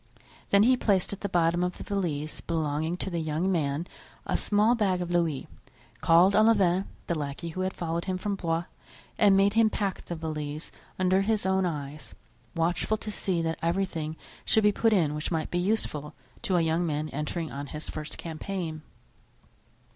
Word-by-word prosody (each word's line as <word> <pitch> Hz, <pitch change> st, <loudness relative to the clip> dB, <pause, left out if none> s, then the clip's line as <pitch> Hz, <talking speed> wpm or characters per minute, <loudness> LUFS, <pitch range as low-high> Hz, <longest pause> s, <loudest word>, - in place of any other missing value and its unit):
Then 200 Hz, 0 st, +6 dB
he 255 Hz, +3 st, +5 dB
placed 200 Hz, -6 st, +1 dB
at 200 Hz, -, -7 dB
the 200 Hz, -, -2 dB
bottom 175 Hz, 0 st, +2 dB
of 180 Hz, 0 st, -2 dB
the -, -, -7 dB
valise 155 Hz, -7 st, -2 dB
belonging 160 Hz, +1 st, -1 dB
to 190 Hz, -, -3 dB
the 170 Hz, -1 st, -1 dB
young 160 Hz, +4 st, 0 dB
man 155 Hz, -2 st, 0 dB, 0.4 s
a -, -, -1 dB
small 210 Hz, +3 st, +3 dB
bag 200 Hz, -6 st, +1 dB
of 175 Hz, -1 st, -3 dB
louis, 165 Hz, -5 st, 0 dB, 0.5 s
called 170 Hz, +7 st, +5 dB
Olivain, 200 Hz, -4 st, +4 dB, 0.2 s
the -, -, -1 dB
lackey 150 Hz, +2 st, -4 dB
who 185 Hz, +3 st, -4 dB
had 185 Hz, 0 st, 0 dB
followed 170 Hz, -1 st, -2 dB
him 185 Hz, -1 st, -1 dB
from 205 Hz, +2 st, -2 dB
Blois, 170 Hz, -3 st, -1 dB, 0.6 s
and 200 Hz, -3 st, +6 dB
made 200 Hz, +1 st, +4 dB
him 225 Hz, 0 st, +5 dB
pack 200 Hz, -3 st, -2 dB
the 175 Hz, -, -4 dB
valise 155 Hz, -1 st, -5 dB, 0.3 s
under 185 Hz, +1 st, +3 dB
his 210 Hz, 0 st, 0 dB
own 190 Hz, -1 st, +2 dB
eyes, 150 Hz, -2 st, -6 dB, 0.4 s
watchful 175 Hz, +6 st, +1 dB
to 215 Hz, 0 st, -6 dB
see 185 Hz, -4 st, 0 dB
that 165 Hz, 0 st, -2 dB
everything 165 Hz, -3 st, -1 dB, 0.3 s
should 220 Hz, -, +3 dB
be 210 Hz, -, +6 dB
put 225 Hz, +2 st, +2 dB
in 165 Hz, -8 st, +3 dB
which 150 Hz, +1 st, -3 dB
might 160 Hz, -3 st, -2 dB
be 175 Hz, -, +1 dB
useful 155 Hz, -7 st, -1 dB, 0.3 s
to 185 Hz, -, +1 dB
a -, -, +4 dB
young 165 Hz, +1 st, +1 dB
man 155 Hz, -2 st, -1 dB
entering 155 Hz, +2 st, -3 dB
on 140 Hz, +1 st, -5 dB
his 150 Hz, +2 st, -7 dB
first 155 Hz, 0 st, -6 dB
campaign. 165 Hz, -1 st, -4 dB
175 Hz, 185 wpm, -28 LUFS, 155-195 Hz, 0.6 s, Then